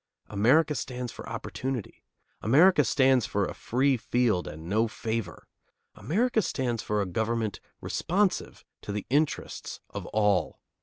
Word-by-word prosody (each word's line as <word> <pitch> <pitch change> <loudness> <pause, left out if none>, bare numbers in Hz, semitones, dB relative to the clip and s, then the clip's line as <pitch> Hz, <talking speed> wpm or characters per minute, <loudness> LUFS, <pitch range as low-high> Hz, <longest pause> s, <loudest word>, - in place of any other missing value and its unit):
America 130 +10 +3
stands 125 -3 -4
for - - -9
opportunity. 130 -5 -5 0.4
America 150 - +5
stands 130 -1 +3
for 100 -1 0
a - - -5
free 135 +3 +1
field 115 -5 +1
and 80 +2 -8
no 110 +5 +2
favor. 110 -5 -4 0.5
America 225 +7 +1
stands 120 - -2
for 105 -1 0
a - - -3
government 110 +3 -1 0.2
responsive 195 +2 -1 0.2
to - - -6
the 105 -1 -3
interests 150 +2 -1
of - - -6
all. 105 -3 +1
120 Hz, 135 wpm, -28 LUFS, 105-140 Hz, 0.5 s, America